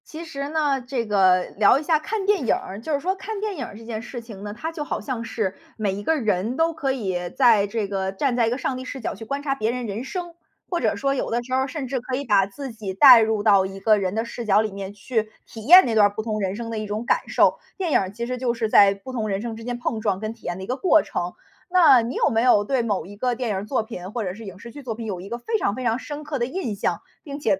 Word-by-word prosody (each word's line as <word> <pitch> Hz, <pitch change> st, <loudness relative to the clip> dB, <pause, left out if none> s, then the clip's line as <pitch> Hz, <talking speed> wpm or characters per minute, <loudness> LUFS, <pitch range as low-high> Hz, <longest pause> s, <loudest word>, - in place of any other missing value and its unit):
其 320 Hz, +2 st, -8 dB
实 280 Hz, -3 st, -5 dB
呢， 295 Hz, -4 st, +1 dB
这 250 Hz, -1 st, -3 dB
个 190 Hz, -3 st, +4 dB
聊 210 Hz, +4 st, +6 dB
一 -, -, -6 dB
下 310 Hz, 0 st, +2 dB
看 390 Hz, +5 st, -3 dB
电 400 Hz, -9 st, +2 dB
影 -, -, +4 dB
儿， 195 Hz, +3 st, -7 dB
就 310 Hz, +6 st, -3 dB
是 280 Hz, -, +1 dB
说 370 Hz, +6 st, -1 dB
看 410 Hz, +2 st, -6 dB
电 420 Hz, -1 st, -3 dB
影 260 Hz, -, -3 dB
儿 205 Hz, -, -10 dB
这 225 Hz, -, -12 dB
件 225 Hz, -1 st, -4 dB
事 240 Hz, +1 st, -7 dB
情 220 Hz, -4 st, -10 dB
呢， 205 Hz, 0 st, -5 dB
它 320 Hz, +9 st, -5 dB
就 315 Hz, -2 st, -5 dB
好 -, -, -3 dB
像 255 Hz, -4 st, -4 dB
是 220 Hz, -4 st, -2 dB, 0.2 s
每 210 Hz, -3 st, -1 dB
一 205 Hz, +1 st, -5 dB
个 320 Hz, -, +2 dB
人 215 Hz, 0 st, -1 dB
都 330 Hz, +1 st, +2 dB
可 285 Hz, -4 st, -1 dB
以 185 Hz, -8 st, -3 dB
在 225 Hz, -5 st, +4 dB
这 215 Hz, 0 st, -2 dB
个 190 Hz, -1 st, -2 dB
站 245 Hz, +6 st, 0 dB
在 235 Hz, -2 st, +2 dB
一 -, -, +2 dB
个 245 Hz, -, -1 dB
上 265 Hz, -1 st, -2 dB
帝 255 Hz, -, -6 dB
视 265 Hz, +1 st, -7 dB
角 230 Hz, -, -3 dB
去 215 Hz, -, -9 dB
观 280 Hz, +4 st, -3 dB
察 275 Hz, -2 st, 0 dB
别 220 Hz, -3 st, 0 dB
人 250 Hz, 0 st, -4 dB
人 215 Hz, +2 st, -4 dB
生。 345 Hz, +4 st, -5 dB, 0.4 s
或 345 Hz, -, +1 dB
者 -, -, +1 dB
说 275 Hz, 0 st, 0 dB
有 270 Hz, -, -2 dB
的 240 Hz, +1 st, 0 dB
时 255 Hz, +1 st, -7 dB
候 260 Hz, -, +3 dB
儿 265 Hz, -, -1 dB
甚 280 Hz, 0 st, -5 dB
至 260 Hz, 0 st, -2 dB
可 250 Hz, +1 st, -4 dB
以 280 Hz, -, -3 dB
把 205 Hz, -6 st, +3 dB
自 265 Hz, +7 st, -7 dB
己 215 Hz, -4 st, -6 dB
代 250 Hz, +3 st, +9 dB
入 220 Hz, -2 st, +1 dB
到 200 Hz, -3 st, +5 dB
一 195 Hz, 0 st, -7 dB
个 215 Hz, +1 st, +4 dB
人 190 Hz, -1 st, -2 dB
的 225 Hz, -, 0 dB
视 235 Hz, 0 st, -7 dB
角 210 Hz, 0 st, +4 dB
里 215 Hz, -1 st, -2 dB
面 195 Hz, 0 st, -6 dB
去， 215 Hz, +1 st, -2 dB, 0.2 s
体 220 Hz, -2 st, -10 dB
验 365 Hz, +5 st, +9 dB
那 235 Hz, -, -1 dB
段 210 Hz, -2 st, +6 dB
儿 -, -, -4 dB
不 220 Hz, -, -4 dB
同 215 Hz, -1 st, -2 dB
人 190 Hz, -1 st, -1 dB
生 230 Hz, +1 st, -5 dB
的 225 Hz, -, -3 dB
一 215 Hz, -, -4 dB
种 210 Hz, +2 st, -3 dB
感 -, -, +3 dB
受。 -, -, +3 dB, 0.2 s
电 365 Hz, -5 st, -2 dB
影 -, -, +5 dB
儿 190 Hz, -, -2 dB
其 230 Hz, +4 st, -5 dB
实 250 Hz, +1 st, -3 dB
就 245 Hz, -1 st, 0 dB
是 230 Hz, -2 st, -2 dB
在 200 Hz, -2 st, +7 dB
不 200 Hz, +7 st, -10 dB
同 225 Hz, -4 st, -2 dB
人 195 Hz, -1 st, -2 dB
生 230 Hz, -1 st, -5 dB
之 225 Hz, -, -10 dB
间 245 Hz, 0 st, -3 dB
碰 240 Hz, -2 st, -2 dB
撞 205 Hz, -3 st, -1 dB
跟 215 Hz, 0 st, -3 dB
体 230 Hz, -, -21 dB
验 175 Hz, 0 st, -3 dB
的 190 Hz, -, -7 dB
一 -, -, -5 dB
个 255 Hz, -, -2 dB
过 320 Hz, -1 st, +4 dB
程。 175 Hz, 0 st, -4 dB, 0.4 s
那 320 Hz, -9 st, +6 dB
你 235 Hz, +3 st, -4 dB
有 -, -, +2 dB
没 225 Hz, -1 st, +1 dB
有 240 Hz, -4 st, +5 dB
对 255 Hz, +2 st, 0 dB
某 205 Hz, -7 st, -1 dB
一 205 Hz, +2 st, -11 dB
个 250 Hz, +2 st, 0 dB
电 245 Hz, -1 st, -3 dB
影 205 Hz, -, 0 dB
儿 195 Hz, -, -4 dB
作 240 Hz, 0 st, 0 dB
品 185 Hz, -3 st, -8 dB
或 235 Hz, -, -2 dB
者 180 Hz, -2 st, -3 dB
是 220 Hz, +3 st, -10 dB
影 190 Hz, -2 st, -9 dB
视 235 Hz, -, -10 dB
剧 285 Hz, -, -10 dB
作 240 Hz, -5 st, -4 dB
品 230 Hz, 0 st, -7 dB
有 195 Hz, -5 st, -4 dB
一 185 Hz, -, -9 dB
个 235 Hz, -, -4 dB
非 445 Hz, -, -1 dB
常 200 Hz, -, 0 dB
非 255 Hz, -, -5 dB
常 230 Hz, 0 st, +1 dB
深 295 Hz, +2 st, -7 dB
刻 295 Hz, -2 st, -4 dB
的 240 Hz, -, +1 dB
印 260 Hz, -, -3 dB
象， 200 Hz, -, -2 dB, 0.2 s
并 280 Hz, -3 st, -7 dB
且 210 Hz, -9 st, +1 dB
230 Hz, 335 characters per minute, -23 LUFS, 205-270 Hz, 0.4 s, 代